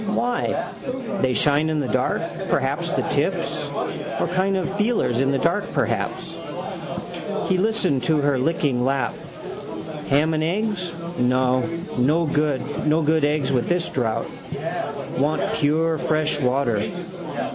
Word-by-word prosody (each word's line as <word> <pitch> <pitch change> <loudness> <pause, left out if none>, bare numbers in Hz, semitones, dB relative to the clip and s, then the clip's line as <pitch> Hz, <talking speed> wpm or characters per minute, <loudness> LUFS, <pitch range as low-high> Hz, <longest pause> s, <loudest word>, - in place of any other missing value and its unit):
Why? 240 +3 0 0.5
They 130 -1 +3
shine 145 +4 +3
in 155 -1 +1
the 140 - 0
dark, - - +1 0.3
perhaps, - - +1
the - - +1
tips. - - 0 0.5
Or - - +1
kind 190 +1 +2
of 190 +1 -2
feelers 210 - +2
in 135 0 +2
the 135 - +1
dark, 180 +7 +1
perhaps. - - -1 1.1
He 185 - +3
listened 185 - +1
to 155 +2 +3
her 140 -2 +2
licking 135 -3 +1
lap. 135 -2 +1 1.0
Ham 150 +4 +4
and 155 0 +1
eggs, 185 0 -1 0.3
no. 125 +1 +3 0.4
No 150 +7 +3
good 150 +1 +1
eggs 150 -2 +1
with 125 -3 +1
this 175 -1 +1
drouth. 115 -4 -1 0.9
Want 145 +4 +1
pure 160 +2 +2
fresh 155 -1 +1
water. 125 - +1
150 Hz, 125 wpm, -23 LUFS, 135-170 Hz, 1.1 s, Ham